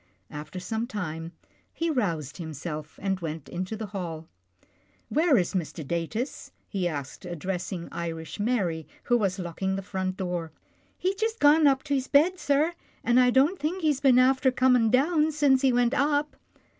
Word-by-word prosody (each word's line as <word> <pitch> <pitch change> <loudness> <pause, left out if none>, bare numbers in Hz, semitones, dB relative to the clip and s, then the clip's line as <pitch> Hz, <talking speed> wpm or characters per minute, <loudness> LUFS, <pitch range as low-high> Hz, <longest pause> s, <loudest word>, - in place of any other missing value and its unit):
After 150 +5 -7
some 220 +5 -3
time, 165 -7 -5 0.4
he 335 0 -1
roused 170 - -1
himself, 155 -2 -6
and 195 -1 0
went 160 -3 -5
into 185 +5 -4
the 220 - -4
hall. 170 -6 -6 0.4
" 95 +3 -38
Where 310 -2 +4
is 180 - 0
Mr. 165 -4 -3
Datus? 170 - -3
" - - -43
he 190 -4 -1
asked, 145 -5 -5
addressing 180 0 -4
Irish 165 +1 -5
Mary 195 -8 0 0.2
who 245 - +2
was 195 -4 0
locking 190 +2 -2
the 195 - -4
front 185 -1 -3
door. 175 -4 -3 0.2
" - - -38
He's 375 +1 0
jist 445 +3 -2
gone 295 +1 +6
up 270 -1 +3
to 285 - -2
his 265 -1 0
bed, 340 +6 +4
sir, 295 +4 +2 0.3
an' 240 +1 +4
I 250 0 +5
don't 280 +9 +3
think 330 +5 -2
he's 295 -3 +2
been 265 -3 +5
after 260 +1 +4
comin' 250 -3 +3
down 305 +5 +3
since 280 -3 +3
he 265 - +4
went 245 0 +2
up.' 290 +1 +1
215 Hz, 180 wpm, -27 LUFS, 170-275 Hz, 0.4 s, gone